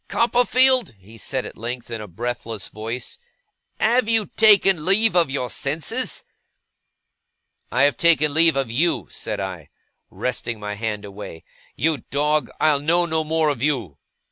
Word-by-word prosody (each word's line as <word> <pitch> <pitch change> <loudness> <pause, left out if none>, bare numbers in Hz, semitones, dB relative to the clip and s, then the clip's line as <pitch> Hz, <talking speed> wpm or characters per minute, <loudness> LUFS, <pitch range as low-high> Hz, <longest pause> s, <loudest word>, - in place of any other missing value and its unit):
'Copperfield,' 245 - +3
he 100 +4 -16
said 130 +4 -4
at - - -10
length, 120 +1 -5
in 115 -1 -4
a 105 - -8
breathless 115 +1 -5
voice, 115 - -6 0.6
'have 230 +1 +2
you 225 -2 +3
taken 200 -6 +5
leave 205 +4 +3
of 170 -5 +4
your 135 -2 -2
senses?' 145 +5 -2 1.5
'I 125 - +2
have 145 - +3
taken 155 -3 +3
leave 160 0 +4
of 135 -4 -1
you,' 165 +8 +1
said - - -5
I, 95 -6 -6 0.4
wresting 120 -2 -4
my 105 0 -5
hand 105 -1 -4
away. 100 -5 -9 0.3
'You 155 -2 0
dog, 150 +2 +1
I'll 150 -2 +3
know 170 +4 +2
no 160 -1 -1
more 160 0 +1
of 140 -5 -3
you. 120 - -1
140 Hz, 150 wpm, -22 LUFS, 115-170 Hz, 1.5 s, taken